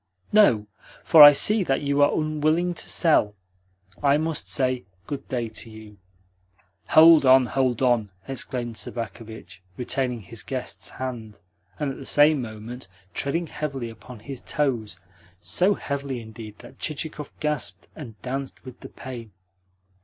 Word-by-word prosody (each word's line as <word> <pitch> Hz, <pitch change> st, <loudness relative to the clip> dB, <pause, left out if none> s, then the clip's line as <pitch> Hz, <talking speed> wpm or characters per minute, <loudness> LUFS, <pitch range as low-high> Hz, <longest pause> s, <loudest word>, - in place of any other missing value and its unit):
"No, 160 Hz, -, +5 dB, 0.4 s
for 160 Hz, -, +7 dB
I 145 Hz, 0 st, +13 dB
see 210 Hz, +8 st, +3 dB
that 135 Hz, -6 st, 0 dB
you 140 Hz, 0 st, +1 dB
are 145 Hz, -, +5 dB
unwilling 155 Hz, +3 st, 0 dB
to -, -, -7 dB
sell. 130 Hz, -, +2 dB, 0.7 s
I 140 Hz, 0 st, +4 dB
must 160 Hz, 0 st, -3 dB
say 130 Hz, -4 st, 0 dB, 0.2 s
good 140 Hz, -1 st, -6 dB
day 120 Hz, -3 st, -2 dB
to 110 Hz, +1 st, -8 dB
you." 110 Hz, -2 st, -13 dB, 0.9 s
"Hold 160 Hz, -1 st, +7 dB
on, 130 Hz, -1 st, +6 dB
hold 130 Hz, -1 st, 0 dB
on!" 120 Hz, -5 st, +2 dB, 0.2 s
exclaimed 125 Hz, -3 st, -4 dB
Sobakevitch, 110 Hz, -4 st, -7 dB, 0.2 s
retaining 125 Hz, -1 st, -2 dB
his 110 Hz, +2 st, -9 dB
guest's 130 Hz, -2 st, -6 dB
hand, 115 Hz, -5 st, -7 dB, 0.4 s
and 145 Hz, -2 st, -1 dB
at -, -, -8 dB
the 135 Hz, -, -10 dB
same 145 Hz, -1 st, +4 dB
moment 115 Hz, +1 st, -8 dB, 0.3 s
treading 165 Hz, +5 st, -1 dB
heavily 135 Hz, -7 st, -5 dB
upon 115 Hz, 0 st, -13 dB
his 135 Hz, +3 st, -8 dB
toes 125 Hz, -, -2 dB, 0.4 s
so 185 Hz, -, +2 dB
heavily, 140 Hz, -2 st, -4 dB
indeed, 110 Hz, -2 st, -10 dB
that -, -, -15 dB
Chichikov 155 Hz, -1 st, -5 dB
gasped 150 Hz, -1 st, -3 dB
and 115 Hz, -8 st, -10 dB
danced 135 Hz, +2 st, -5 dB
with 130 Hz, -, -11 dB
the -, -, -10 dB
pain. 120 Hz, -4 st, -9 dB
130 Hz, 145 wpm, -24 LUFS, 115-150 Hz, 0.9 s, I